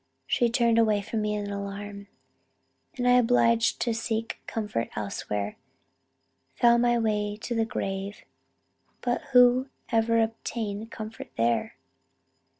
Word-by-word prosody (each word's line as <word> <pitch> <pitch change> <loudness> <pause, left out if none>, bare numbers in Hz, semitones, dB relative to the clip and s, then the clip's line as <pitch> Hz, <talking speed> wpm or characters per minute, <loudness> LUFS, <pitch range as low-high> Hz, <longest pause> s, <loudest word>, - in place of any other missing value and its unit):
She 240 - +2
turned 235 -1 +3
away 215 -3 +3
from 220 +2 -2
me 210 0 -1
in 205 -1 -3
alarm, 200 0 -6 0.9
and 245 -1 0
I, - - +6
obliged 230 -1 +3
to 235 - +1
seek 225 0 -3
comfort 210 - -2
elsewhere, 105 0 -3 1.0
found 235 0 +5
my 240 0 +3
way 210 -2 0
to 240 - -2
the 225 -1 +1
grave, 195 -1 -4 0.8
but 245 +3 0
who 250 -1 +5 0.2
ever 230 0 +3
obtained 225 -1 -3
comfort 220 -1 -8
there? 115 -1 +1
225 Hz, 125 wpm, -27 LUFS, 205-235 Hz, 1.0 s, I